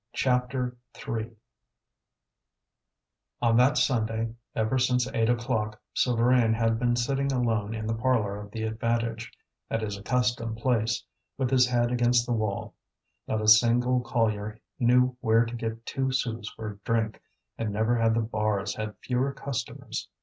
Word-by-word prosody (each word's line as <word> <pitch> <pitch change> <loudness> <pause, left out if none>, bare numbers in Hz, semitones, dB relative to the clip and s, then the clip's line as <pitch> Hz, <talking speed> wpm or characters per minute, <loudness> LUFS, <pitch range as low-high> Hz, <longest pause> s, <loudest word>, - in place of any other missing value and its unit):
CHAPTER 125 -1 0 0.2
III 115 0 -4 2.1
On 115 -1 +3
that 130 +5 +4
Sunday, 115 -3 0 0.2
ever 110 +4 +1
since 125 0 +2
eight 115 -3 +2
o'clock, 115 -3 -1 0.2
Souvarine 120 -1 +3
had 115 0 +1
been 120 0 +2
sitting 135 +3 0
alone 115 -4 0
in 110 -1 -4
the 110 - -1
parlour 110 -4 0
of 105 - -10
the 110 +1 -5
Avantage, 115 +1 -2 0.4
at 115 0 -1
his 105 -2 -3
accustomed 120 0 0
place, 115 -1 0 0.3
with 130 -2 -1
his 125 -1 +5
head 120 -1 +1
against 120 -1 +3
the 120 - -1
wall. 110 -3 -2 0.5
Not 110 - -1
a - - -1
single 120 +3 +5
collier 110 -3 -1 0.2
knew 125 +1 +3
where 115 0 +3
to 115 - -7
get 115 0 -5
two 135 -1 -1
sous 115 -4 -2
for 110 -1 -5
a 100 - -12
drink, 110 0 -1 0.4
and 110 -2 -1
never 110 +3 +1
had 115 -1 +2
the 115 - +2
bars 105 -2 -1
had 110 0 -5
fewer 130 +2 0
customers. 140 -3 -5
115 Hz, 150 wpm, -27 LUFS, 110-125 Hz, 2.1 s, his